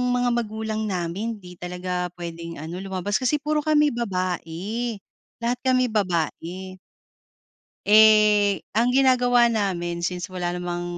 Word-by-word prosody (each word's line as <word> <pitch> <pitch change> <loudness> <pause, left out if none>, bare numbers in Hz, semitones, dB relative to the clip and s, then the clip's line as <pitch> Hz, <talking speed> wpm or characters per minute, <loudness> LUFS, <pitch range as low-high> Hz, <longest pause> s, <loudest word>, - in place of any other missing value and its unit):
mga 245 0 +1
magulang 220 -1 -2
namin 190 +5 -3
di 180 -1 -11
talaga 180 0 -3
puwedeng 170 -1 -7
ano 165 +3 -6
lumabas 195 +1 -2
Kasi 260 +4 +2
puro 300 +1 0
kami 300 -1 +4
babae. 200 +1 -3 0.5
Lahat 240 +1 -1
kami 255 -1 +3
babae. 185 -1 -2 1.1
Eh, 210 -1 +6 0.2
ang 235 +3 +3
ginagawa 250 -2 +4
namin 180 -6 -1
since 180 +1 -2
wala 180 -2 -3
namang 175 0 -4
200 Hz, 120 wpm, -24 LUFS, 180-235 Hz, 1.1 s, Eh